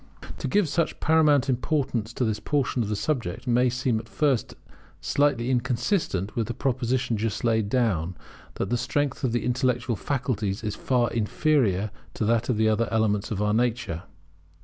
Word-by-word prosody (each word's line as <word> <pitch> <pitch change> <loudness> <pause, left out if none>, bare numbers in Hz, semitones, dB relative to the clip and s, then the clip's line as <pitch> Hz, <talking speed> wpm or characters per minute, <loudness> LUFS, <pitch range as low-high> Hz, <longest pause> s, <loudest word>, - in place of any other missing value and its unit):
To - - -2
give 205 -3 +2
such 165 +2 -1
paramount 150 -4 +4
importance 130 -3 -1
to 125 - 0
this 110 -2 -1
portion 135 -4 0
of 105 - -2
the 105 - 0
subject 120 - -2
may 125 0 +3
seem 125 -2 0
at 115 - -11
first 140 -6 0 0.4
sight 135 - +2
inconsistent 125 - 0
with 115 -2 -1
the 120 - -4
proposition 125 -2 0
just 110 0 -2
laid 110 -3 +1
down, 95 -9 0 0.4
that - - -3
the 120 - +1
strength 140 +2 -1
of 125 - +1
the 120 - -1
intellectual 125 -1 0
faculties 115 -5 -2
is 105 -1 -2
far 125 -2 +1
inferior 110 - +1 0.2
to 110 - -1
that 115 +2 +1
of 120 - +1
the 110 0 +3
other 110 +1 +2
elements 105 -2 +1
of 105 -1 -1
our 105 0 +1
nature. 115 -7 0
120 Hz, 170 wpm, -26 LUFS, 110-130 Hz, 0.4 s, paramount